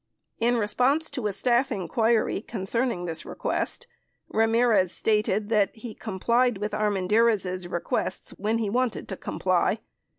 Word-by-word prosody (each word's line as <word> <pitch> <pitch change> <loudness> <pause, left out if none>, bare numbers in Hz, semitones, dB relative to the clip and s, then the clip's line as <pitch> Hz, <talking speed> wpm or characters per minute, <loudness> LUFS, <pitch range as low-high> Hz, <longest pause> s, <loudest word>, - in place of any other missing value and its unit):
32 230 - +2
In - - +1
response 250 +9 +1
to 255 -6 -2
a - - -1
staff 245 +6 +1
inquiry 220 +2 +1
concerning 220 -2 -2
this 165 -2 -3
request, 480 - -3 0.4
Ramirez 225 -4 +3
stated 210 -1 0
that 210 -3 +2
he 225 0 -8
complied 235 +4 +1
with 210 +2 -3
Armendariz' 205 -2 +1
requests 175 - -2
when 215 +3 -1
he 225 -2 -1
wanted 245 +2 -1
to - - -3
com - - -6
ply. - - +2
220 Hz, 140 wpm, -26 LUFS, 195-235 Hz, 0.4 s, Ramirez